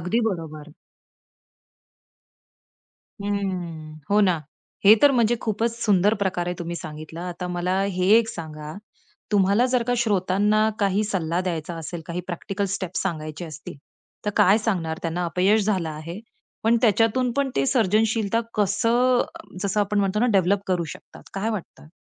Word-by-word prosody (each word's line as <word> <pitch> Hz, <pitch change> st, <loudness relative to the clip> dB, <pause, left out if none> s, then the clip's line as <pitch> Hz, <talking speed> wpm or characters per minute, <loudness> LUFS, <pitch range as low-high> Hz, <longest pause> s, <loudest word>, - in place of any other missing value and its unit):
अगदी 180 Hz, +8 st, 0 dB
बरोबर. 155 Hz, -3 st, -7 dB, 2.5 s
हं. 175 Hz, -6 st, -4 dB
हो 210 Hz, +1 st, +5 dB
ना. 180 Hz, -5 st, +3 dB, 0.4 s
हे 210 Hz, +2 st, +10 dB
तर 290 Hz, -, +8 dB
म्हणजे 235 Hz, -1 st, +3 dB
खूपच 225 Hz, +1 st, -1 dB
सुंदर 205 Hz, 0 st, +3 dB
प्रकार 180 Hz, -2 st, -1 dB
आहे 180 Hz, -, -2 dB
तुम्ही 170 Hz, 0 st, -4 dB
सांगितला. 155 Hz, +1 st, -8 dB
आता 180 Hz, +1 st, -5 dB
मला 180 Hz, +2 st, -1 dB
हे 185 Hz, -2 st, -1 dB
एक 225 Hz, -1 st, 0 dB
सांगा 155 Hz, -5 st, -7 dB, 0.6 s
तुम्हाला 200 Hz, +5 st, +4 dB
जर 250 Hz, -1 st, +1 dB
का 245 Hz, +1 st, 0 dB
श्रोतांना 210 Hz, 0 st, +2 dB
काही 200 Hz, +1 st, +1 dB
सल्ला 180 Hz, -4 st, -1 dB
द्यायचा 170 Hz, -2 st, -3 dB
असेल, 165 Hz, +1 st, -6 dB
काही 170 Hz, +1 st, -3 dB
प्रॅक्टिकल 195 Hz, +3 st, -3 dB
स्टेप्स 185 Hz, -2 st, -3 dB
सांगायचे 160 Hz, -2 st, -4 dB
असतील, 155 Hz, -2 st, -9 dB, 0.5 s
तर 210 Hz, -, 0 dB
काय 205 Hz, +1 st, +5 dB
सांगणार 175 Hz, -8 st, -2 dB
त्यांना? 175 Hz, +1 st, -2 dB
अपयश 190 Hz, +5 st, +2 dB
झालं 190 Hz, -6 st, 0 dB
आहे. 165 Hz, +6 st, -7 dB, 0.4 s
पण 225 Hz, +2 st, +4 dB
त्याच्यातून 230 Hz, +3 st, +3 dB
पण 280 Hz, -1 st, +1 dB
ते 135 Hz, -, +2 dB
सर्जनशीलता 220 Hz, -, +2 dB
कसं 230 Hz, +5 st, +2 dB, 0.4 s
जसं 200 Hz, +1 st, 0 dB
आपण 205 Hz, 0 st, 0 dB
म्हणतो 195 Hz, +1 st, 0 dB
ना 245 Hz, -, +3 dB
डेव्हलप 195 Hz, +1 st, +3 dB
करू 180 Hz, -3 st, 0 dB
शकतात -, -, -15 dB
काय 205 Hz, +3 st, -1 dB
वाटतं? 195 Hz, -7 st, -7 dB
190 Hz, 145 wpm, -24 LUFS, 170-215 Hz, 2.5 s, हे